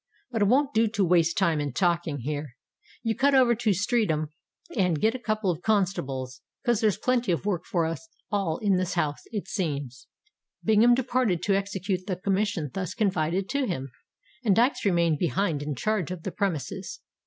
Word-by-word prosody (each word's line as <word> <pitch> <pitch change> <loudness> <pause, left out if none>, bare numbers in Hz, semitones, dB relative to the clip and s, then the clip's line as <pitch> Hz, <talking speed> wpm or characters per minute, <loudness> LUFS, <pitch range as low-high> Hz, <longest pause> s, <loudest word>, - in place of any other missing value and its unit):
But 225 -3 -1
it - - +5
wont 280 +5 +3
do 225 +1 +3
to 205 -3 +1
waste 170 -1 +3
time 165 -6 +2
in 145 -3 -3
talking 170 -2 0
here. 145 -1 -4 0.5
You 225 -1 0
cut 280 +1 +3
over 250 -3 +5
to 230 -1 +1
Streatham 190 -6 +1 0.5
and 180 -7 +2
get 220 +6 +2
a 255 - -5
couple 215 -4 0
of 165 0 -5
constables—'cos 185 - -1
there's 215 -3 +2
plenty 250 -5 +1
of 170 - -1
work 180 -5 -1
for 170 -3 +1
us 165 - -4 0.2
all 195 -6 0
in 200 -3 +3
this 185 -1 -1
house, 150 -4 -1
it 210 -4 -4
seems." 145 - -3 0.6
Bingham 225 +2 +5
departed 250 -7 0
to 200 - +2
execute 195 -1 -2
the 185 - -1
commission 190 -5 -1
thus 185 -3 -4
confided 185 -2 0
to 280 -1 0
him; 135 - -4 0.5
and 205 -5 +3
Dykes 240 +3 +2
remained 170 -5 +2
behind 165 -1 0
in 145 -1 -3
charge 210 - -1
of 180 -3 -6
the 190 - -3
premises. 170 - -3
190 Hz, 180 wpm, -27 LUFS, 160-215 Hz, 0.6 s, it